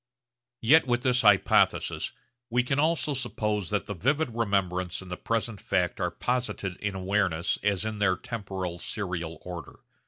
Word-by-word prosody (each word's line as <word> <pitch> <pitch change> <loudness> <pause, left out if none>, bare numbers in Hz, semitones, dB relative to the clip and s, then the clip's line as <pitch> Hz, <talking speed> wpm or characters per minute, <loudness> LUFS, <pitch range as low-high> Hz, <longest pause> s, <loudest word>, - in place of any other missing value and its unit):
Yet 145 +6 +6
with 120 0 +1
this 125 -1 +3
hypothesis 105 -4 +3 0.4
we 125 +1 +2
can 135 +3 0
also 155 -1 +2
suppose 105 -7 -2
that 105 - 0
the 105 - -4
vivid 135 - 0
remembrance 95 -5 0
and 90 - -11
the - - -1
present 115 0 -2
fact 90 -2 0
are - - +1
posited 120 -7 -2
in 100 -2 -3
awareness 95 -3 0
as 105 0 0
in 110 -1 -3
their 95 -3 +3
temporal 95 -6 -5
serial 85 -5 -4
order. 90 -2 -8
105 Hz, 155 wpm, -28 LUFS, 95-120 Hz, 0.4 s, Yet